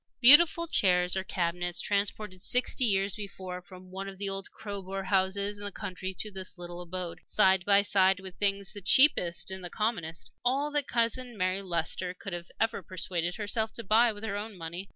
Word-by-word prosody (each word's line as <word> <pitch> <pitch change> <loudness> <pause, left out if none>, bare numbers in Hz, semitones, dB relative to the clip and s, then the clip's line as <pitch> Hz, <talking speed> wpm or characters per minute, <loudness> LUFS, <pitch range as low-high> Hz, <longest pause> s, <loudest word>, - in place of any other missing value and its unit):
Beautiful 315 +6 +8
chairs, 180 - +2
or 190 - -1
cabinets 175 -1 -2
transported 200 -1 -1
sixty 250 +3 +1
years 195 -2 +2
before 190 -3 -7
from 185 0 -14
one 195 +1 -6
of 195 -1 -8
the 200 +1 -2
old 195 0 -5
Crowborough 195 -2 -6
houses 200 +1 0
in - - -8
the 205 - -4
country 190 -2 -5
to 215 - -3
this 190 -1 -8
little 175 0 -8
abode, 175 -1 -6
side 190 -3 +4
by 200 0 +5
side 190 -1 +3
with 190 -1 -9
things 200 -1 -1
the 205 - -8
cheapest 190 - +5
and 190 -1 -6
the 175 - -4
commonest 170 - -3
all 275 +4 +1
that 295 -2 0
Cousin 235 0 -1
Mary 185 +1 0
Leicester 180 0 -2
could 190 0 -8 0.3
ever 225 -2 0
persuade 175 -1 -3
herself 220 +1 -2
to 230 - -6
buy 225 +3 +4
with 205 0 -10
her 210 -2 -3
own 210 0 -6
money. 170 +3 -6
195 Hz, 190 wpm, -29 LUFS, 185-210 Hz, 0.3 s, Beautiful